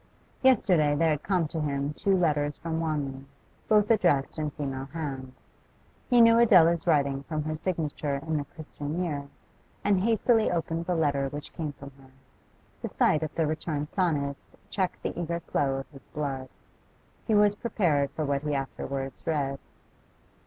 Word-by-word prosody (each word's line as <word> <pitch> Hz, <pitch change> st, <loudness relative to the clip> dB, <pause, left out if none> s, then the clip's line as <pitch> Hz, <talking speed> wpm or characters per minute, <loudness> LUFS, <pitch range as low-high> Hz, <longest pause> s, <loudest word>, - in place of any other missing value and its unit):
Yesterday 180 Hz, -, +4 dB
there 160 Hz, +1 st, +3 dB
had 150 Hz, -1 st, -1 dB
come 180 Hz, -5 st, +1 dB
to 165 Hz, -, -3 dB
him 140 Hz, 0 st, -1 dB
two 195 Hz, +4 st, +1 dB
letters 150 Hz, -4 st, +1 dB
from 165 Hz, -1 st, -3 dB
Wanley, 145 Hz, -4 st, -2 dB, 0.4 s
both 210 Hz, 0 st, +4 dB
addressed 175 Hz, -10 st, +2 dB
in 155 Hz, -1 st, -1 dB
female 135 Hz, -2 st, -4 dB
hand. 135 Hz, -4 st, -5 dB, 0.8 s
He 245 Hz, -1 st, +6 dB
knew 230 Hz, 0 st, +7 dB
Adela's 170 Hz, -7 st, +5 dB
writing 140 Hz, -4 st, +2 dB
from 155 Hz, +1 st, -3 dB
her 155 Hz, +1 st, -3 dB
signature 155 Hz, -4 st, -2 dB
in 155 Hz, +3 st, -2 dB
the 145 Hz, -, -2 dB
'Christian 155 Hz, +2 st, -5 dB
Year,' 145 Hz, -5 st, -3 dB, 0.6 s
and 200 Hz, -2 st, +3 dB
hastily 225 Hz, +2 st, +3 dB
opened 165 Hz, 0 st, -2 dB
the 180 Hz, -, +1 dB
letter 140 Hz, -4 st, +1 dB
which 145 Hz, +1 st, -7 dB
came 155 Hz, -4 st, -4 dB
from 140 Hz, 0 st, -11 dB
her. 135 Hz, -1 st, -17 dB, 0.7 s
The -, -, -4 dB
sight 155 Hz, -, +2 dB
of 155 Hz, -1 st, -4 dB
the 160 Hz, -, +1 dB
returned 150 Hz, -1 st, -3 dB
sonnets 145 Hz, -7 st, -1 dB, 0.2 s
checked 185 Hz, -3 st, -2 dB
the -, -, -2 dB
eager 170 Hz, 0 st, -2 dB
flow 140 Hz, -4 st, 0 dB
of 135 Hz, 0 st, -6 dB
his 135 Hz, -2 st, -10 dB
blood; 135 Hz, -3 st, -4 dB, 0.8 s
he 220 Hz, -, +3 dB
was 205 Hz, 0 st, +5 dB
prepared 175 Hz, -, +1 dB
for 155 Hz, -, -3 dB
what 140 Hz, -1 st, 0 dB
he 150 Hz, -1 st, -1 dB
afterwards 135 Hz, 0 st, -4 dB
read. 140 Hz, -4 st, -1 dB
155 Hz, 165 wpm, -28 LUFS, 140-175 Hz, 0.8 s, knew